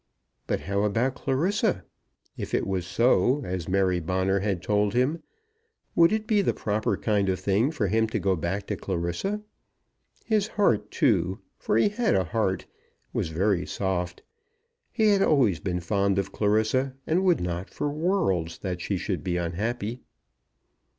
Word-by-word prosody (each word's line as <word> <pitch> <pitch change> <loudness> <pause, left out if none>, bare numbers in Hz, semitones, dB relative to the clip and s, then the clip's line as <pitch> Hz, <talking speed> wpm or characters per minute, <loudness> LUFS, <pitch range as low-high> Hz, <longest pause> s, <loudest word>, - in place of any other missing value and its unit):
But - - -1
how 100 +2 -1
about 115 +5 +1
Clarissa? 185 - 0 0.5
If - - -3
it - - 0
was 95 -2 -2
so, 125 +6 +3
as 90 -1 -4
Mary 95 -1 +2
Bonner 95 +3 0
had 95 -3 -2
told 105 +1 +1
him, 135 +7 +1 0.7
would 170 +2 +5
it 215 0 0
be 210 -2 +3
the - - 0
proper 105 0 -1
kind 100 -3 +1
of 95 0 0
thing 100 +7 +2
for 150 -9 -1
him 110 +3 +2
to 110 - -2
go 95 -1 +1
back 90 +5 -3
to - - -2
Clarissa? 95 - -2 0.8
His 215 -2 +1
heart, 120 - +1
too, 95 - +1 0.2
for - - +1
he 115 - +4
had 225 - +1
a 95 - +3
heart, 95 +2 -1 0.5
was - - -1
very 90 +3 0
soft. 90 -2 -2 0.7
He 220 -3 +3
had 200 -1 +4
always 130 - +3
been 90 -2 -2
fond 100 +2 +1
of 100 - -1
Clarissa, 110 +6 +1
and 175 +4 +1
would 180 -3 +3
not, 90 +1 -3
for 145 - -3
worlds, 145 - 0
that 90 -2 -4
she 100 - -1
should 95 0 -3
be 90 -1 -1
unhappy. 105 +7 -3
105 Hz, 165 wpm, -26 LUFS, 95-135 Hz, 0.8 s, would